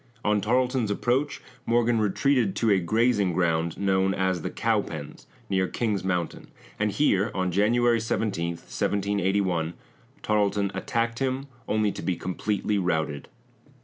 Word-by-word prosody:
On 105 Hz, -1 st, +2 dB
Tarleton's 125 Hz, +1 st, +1 dB
approach, 125 Hz, +7 st, 0 dB, 0.2 s
Morgan 120 Hz, -1 st, +3 dB
retreated 110 Hz, +1 st, +2 dB
to 115 Hz, -2 st, +2 dB
a 95 Hz, -, +4 dB
grazing 105 Hz, +1 st, +2 dB
ground 80 Hz, -1 st, 0 dB
known 95 Hz, -1 st, +1 dB
as 95 Hz, -2 st, 0 dB
the -, -, -3 dB
Cowpens -, -, -2 dB, 0.2 s
near 95 Hz, -1 st, +1 dB
King's 105 Hz, -3 st, -1 dB
Mountain, 90 Hz, -3 st, -2 dB, 0.3 s
and 105 Hz, 0 st, +1 dB
here, 100 Hz, -3 st, +2 dB
on 95 Hz, -1 st, 0 dB
January 115 Hz, +5 st, +3 dB
17, 100 Hz, -6 st, -1 dB
1781, 95 Hz, -3 st, -1 dB, 0.5 s
Tarleton 100 Hz, -1 st, +1 dB
attacked 115 Hz, +4 st, -1 dB
him, 135 Hz, 0 st, -1 dB, 0.2 s
only 105 Hz, -1 st, +1 dB
to -, -, -7 dB
be 90 Hz, -, -1 dB
completely 100 Hz, +3 st, -1 dB
routed. 80 Hz, -5 st, -1 dB
100 Hz, 130 wpm, -26 LUFS, 95-115 Hz, 0.5 s, a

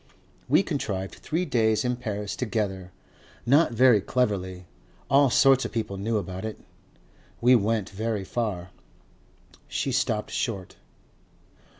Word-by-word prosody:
We -, -, +5 dB
contrived 95 Hz, 0 st, -3 dB
three 170 Hz, +4 st, -2 dB
days 115 Hz, -5 st, +1 dB
in 125 Hz, 0 st, +1 dB
Paris 105 Hz, -4 st, -4 dB
together 100 Hz, -6 st, -3 dB, 0.5 s
not 140 Hz, +4 st, +4 dB
very 120 Hz, -2 st, +5 dB
cleverly. 95 Hz, -8 st, -1 dB, 0.5 s
All 140 Hz, 0 st, +5 dB
sorts 135 Hz, +2 st, +5 dB
of -, -, -4 dB
people 110 Hz, -4 st, -3 dB
know 110 Hz, +3 st, -1 dB
about 95 Hz, -1 st, -5 dB
it.... 110 Hz, -1 st, -5 dB, 0.8 s
We 125 Hz, +2 st, +5 dB
went 110 Hz, -3 st, 0 dB
very 110 Hz, 0 st, -2 dB
far." 95 Hz, -5 st, -3 dB, 1.0 s
She 135 Hz, -, -2 dB
stopped 115 Hz, -4 st, -1 dB
short. 100 Hz, -6 st, -3 dB
110 Hz, 120 wpm, -26 LUFS, 100-125 Hz, 1.0 s, We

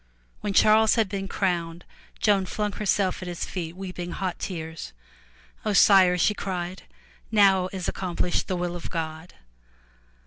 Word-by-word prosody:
When 205 Hz, -, -3 dB
Charles 215 Hz, +2 st, +5 dB
had 225 Hz, -3 st, +2 dB
been 195 Hz, 0 st, -4 dB
crowned, 175 Hz, -3 st, -2 dB, 0.3 s
Joan 200 Hz, -3 st, +2 dB
flung 210 Hz, +2 st, -2 dB
herself 195 Hz, -3 st, 0 dB
at 185 Hz, -, -6 dB
his 175 Hz, -1 st, -4 dB
feet 170 Hz, -2 st, -5 dB
weeping 180 Hz, -2 st, -6 dB
hot 185 Hz, -2 st, -3 dB
tears. 160 Hz, -, -6 dB, 0.7 s
0 210 Hz, -, 0 dB
Sire,'* 185 Hz, -2 st, +6 dB
she 180 Hz, +5 st, +3 dB
cried, 185 Hz, -2 st, -4 dB, 0.5 s
"Now 195 Hz, -3 st, +4 dB
is 185 Hz, -3 st, -4 dB
accomplished 180 Hz, -1 st, -1 dB
the 185 Hz, -, -1 dB
will 175 Hz, 0 st, -3 dB
of 175 Hz, -, -7 dB
God! 160 Hz, 0 st, -5 dB
185 Hz, 145 wpm, -25 LUFS, 175-200 Hz, 0.7 s, Sire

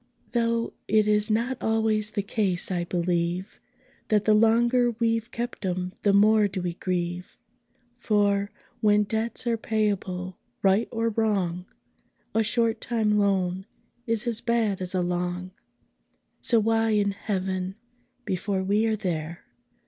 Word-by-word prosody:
Though 230 Hz, -1 st, 0 dB
it 215 Hz, 0 st, +3 dB
is 210 Hz, +1 st, +2 dB
not 235 Hz, +4 st, 0 dB
always 220 Hz, -1 st, +1 dB
the 205 Hz, -1 st, -2 dB
case, 195 Hz, -3 st, -1 dB
I 175 Hz, -1 st, -1 dB
believe, 175 Hz, +1 st, -1 dB, 0.5 s
That 210 Hz, -1 st, +2 dB
the 215 Hz, -, +5 dB
longer 235 Hz, +3 st, +4 dB
we've 230 Hz, 0 st, 0 dB
kept 240 Hz, -2 st, -5 dB
'em, 180 Hz, 0 st, -2 dB
the 205 Hz, -, +3 dB
more 210 Hz, +1 st, +5 dB
do 190 Hz, -1 st, -5 dB
we 175 Hz, -1 st, -2 dB
grieve: 175 Hz, 0 st, -3 dB, 0.6 s
For, 205 Hz, -3 st, +1 dB, 0.3 s
when 210 Hz, -1 st, +4 dB
debts 220 Hz, +4 st, -3 dB
are 235 Hz, -1 st, +1 dB
payable, 195 Hz, -5 st, -2 dB, 0.2 s
right 195 Hz, +3 st, +3 dB
or 230 Hz, 0 st, 0 dB
wrong, 195 Hz, -5 st, -1 dB, 0.7 s
A 225 Hz, -, +3 dB
short 225 Hz, +1 st, +1 dB
time 215 Hz, -3 st, +1 dB
loan 190 Hz, -1 st, 0 dB, 0.4 s
is 230 Hz, -1 st, 0 dB
as 230 Hz, -2 st, +1 dB
bad 230 Hz, -5 st, 0 dB
as 185 Hz, +1 st, -1 dB
a 180 Hz, -, +1 dB
long 180 Hz, +1 st, -2 dB, 0.9 s
So 235 Hz, -, +3 dB
why 225 Hz, +1 st, +2 dB
in 205 Hz, -1 st, +2 dB
Heaven 190 Hz, -2 st, -3 dB, 0.5 s
(before 190 Hz, 0 st, -1 dB
we 205 Hz, +4 st, +2 dB
are 220 Hz, -, +1 dB
there!) 170 Hz, -4 st, -4 dB
210 Hz, 140 wpm, -26 LUFS, 185-225 Hz, 0.9 s, the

